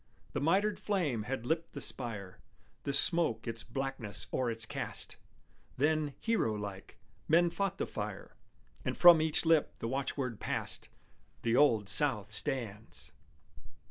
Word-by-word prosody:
The - - -1
mitred 195 +7 +2
flame 165 - 0
had 135 -3 -3
lipped 160 +4 -1
the 140 - -5
spire, 110 -9 -5 0.5
The 140 - 0
smoke 140 -7 +3
its 115 0 -4
blackness 135 -6 -3
o'er 130 -2 +1
it 115 -1 -1
cast; - - -5 0.6
Then, 150 0 +1
hero 225 - +1
like, 100 0 -7 0.3
men 170 +2 +4
fought 195 +1 -1
the - - -1
fire, - - -6 0.5
And - - -2
from 175 -3 +9
each 160 +1 +1
lip 160 -2 +3
the - - -4
watchword 130 -2 -2
passed, - - -4 0.5
"The 115 0 +2
Old 115 -7 +4
South 105 -1 +2
stands!" 110 -2 -3
135 Hz, 140 wpm, -32 LUFS, 115-160 Hz, 0.6 s, from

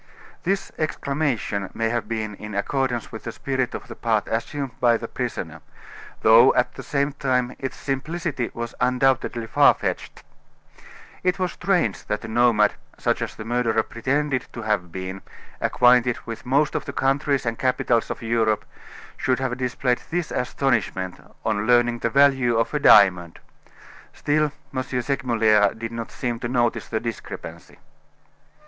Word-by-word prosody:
This 195 +2 -1
exclamation 140 -10 -1
may 115 0 0
have 120 0 -2
been 110 -2 -3
in 105 +1 -8
accordance 120 +2 -1
with 110 - -8
the 115 - -4
spirit 130 +1 -2
of - - -7
the - - -8
part 110 -3 0
assumed 135 +4 -3
by 120 -2 +4
the 115 - -6
prisoner; 85 - -5 0.6
though, 115 +4 +7
at 125 - +1
the - - -8
same 140 0 0
time, 125 -3 0
its 135 - -5
simplicity 145 -1 -3
was 115 0 -4
undoubtedly 125 -2 +1
far 110 - +5
fetched. - - -4 1.0
It 180 0 +1
was 185 -2 -1
strange 175 - 0
that 105 - -3
a - - -6
nomad, 110 -2 +3 0.2
such - - 0
as - - -4
the 110 - -8
murderer 115 -2 +1
pretended 130 +3 -1
to 115 - -6
have 105 -6 -1
been, 95 +1 -6 0.4
acquainted 125 -1 +4
with 115 +1 -7
most 140 +3 +2
of - - -2
the - - -6
countries 135 0 +1
and 115 -1 -2
capitals 125 -2 +1
of - - -5
Europe, 110 -2 +1 0.5
should 130 -1 +1
have 130 -2 -2
displayed 125 0 -1
this 175 0 -2
astonishment 110 -8 -1 0.2
on 110 -1 0
learning 120 -1 +3
the 115 - 0
value 135 -2 +4
of 115 +4 0
a 150 - +1
diamond. 90 - +5 0.8
Still, 150 0 +1 0.2
M. 130 - +1
Segmuller 120 -5 +2
did 115 +1 -5
not 115 -1 -6
seem 120 -2 -3
to 120 - -3
notice 120 -1 0
the 110 - -1
discrepancy. 115 0 -7
120 Hz, 155 wpm, -23 LUFS, 110-135 Hz, 1.0 s, though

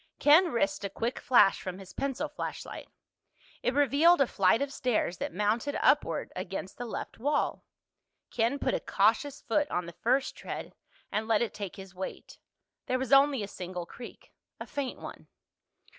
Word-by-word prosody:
Ken 325 +4 +6
risked 295 +1 0
a 200 - -2
quick 230 +6 -3
flash 235 -6 +4
from 185 -1 -5
his 190 -1 -12
pencil 275 +2 -2
flashlight. 295 - -6 0.7
It 250 - 0
revealed 290 +4 +5
a 275 - +5
flight 195 -2 +3
of 280 0 -2
stairs 245 -10 0
that - - -3
mounted 215 - 0
upward - - +2
against 190 +2 -5
the 245 - -4
left 225 - -6
wall. 290 +5 0 0.7
Ken 235 +4 +1
put - - -1
a - - +1
cautious 230 +8 +1
foot 290 +5 +1
on 175 - -1
the 170 - -9
first 260 +8 0
tread - - -7 0.4
and 220 +1 -1
let 225 0 +3
it 235 - -4
take 200 -3 -6
his 190 -1 -11
weight. 190 +1 -7 0.5
There 255 - +1
was 260 0 -1
only 275 -4 +5
a - - -4
single 180 -2 -6
creak—a 240 +7 -12
faint 280 -3 -4
one. - - -9
240 Hz, 170 wpm, -29 LUFS, 195-280 Hz, 0.7 s, Ken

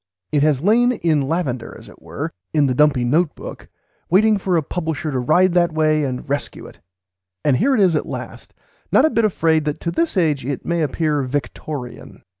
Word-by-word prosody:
It 145 - +2
has 150 -2 +2
lain, 240 +5 +4
in 160 - +1
lavender 135 -4 -3
as - - -15
it - - -16
were, - - -5 0.2
in 150 -2 +4
the 130 - +1
dumpy 140 -2 +3
note 155 +6 +1
book, - - -9 0.4
waiting 210 +4 +4
for 185 -2 0
a 160 - 0
publisher 155 -2 -3
to 130 - -1
ride 175 +8 +3
that 175 -2 +2
way 155 -1 +2
and 130 -2 -4
rescue 140 +1 -4
it; - - -14 0.7
and 140 -4 +3
here 270 +5 +2
he 210 - +3
is 180 -4 +3
at - - -1
last, - - -8 0.4
not - - +5
a 315 - +2
bit 230 - +2
afraid 160 -6 +1
that 150 -1 -2
to 170 - -2
this 320 - -1
age 155 -6 +1
it 135 +1 -4
may 170 -1 0
appear 150 0 0
"Victorian." 130 0 -6
155 Hz, 205 wpm, -20 LUFS, 140-180 Hz, 0.7 s, not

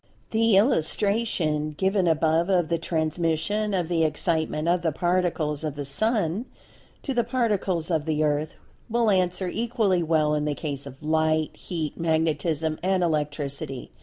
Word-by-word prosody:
The 225 -2 +4
illustration 180 - +1
given 190 0 +1
above 160 +2 +2
of 175 -4 +2
the 170 -1 0
transmission 165 +6 -1
of 175 -3 0
the 165 -1 +1
Excitement 160 0 0
of 175 +1 +2
the 165 -1 0
Particles 170 -3 0
of 150 -3 -3
the 145 -1 -4
Sun 210 - 0 0.6
to 275 - -2
the 240 -1 +2
Particles 205 -8 0
of 155 -3 0
the 155 -1 0
Earth, 150 +1 0 0.3
will 230 -1 +2
answer 185 -1 +1
equally 220 -3 0
well 155 -2 +2
in 150 0 0
the 150 -1 -1
case 140 -3 -5
of 135 +2 -12
Light, 155 0 +1
Heat, 160 -5 -5
Magnetism 160 -1 0
and 185 0 +1
Electricity. 145 -4 -2
165 Hz, 150 wpm, -25 LUFS, 155-190 Hz, 0.6 s, The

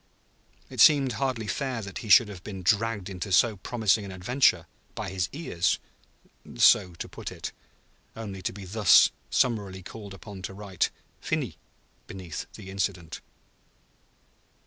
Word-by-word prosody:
It - - -1
seemed 140 -4 +6
hardly 125 -2 -2
fair 130 0 -3
that 100 -1 -6
he 110 - -8
should 110 +3 +8
have 95 -3 -10
been 95 -3 -7
dragged 105 +1 +1
into 95 0 -6
so 110 +3 +4
promising 110 0 +1
an 100 - -7
adventure, 95 -2 +2 0.3
by - - -4
his 95 -1 -1
ears 95 - 0 0.8
(so 90 +7 +5
to - - -6
put - - -7
it), - - -6 0.6
only 100 -4 -7
to - - -2
be 100 0 -9
thus 100 0 +5 0.2
summarily 100 -6 0
called 100 0 -9
upon 100 -1 -10
to 95 +1 -6
write 100 -3 -1 0.3
"Finis" - - -2 0.5
beneath 90 -4 -7
the 95 - -10
incident. 95 -4 -3
100 Hz, 145 wpm, -27 LUFS, 95-115 Hz, 0.8 s, should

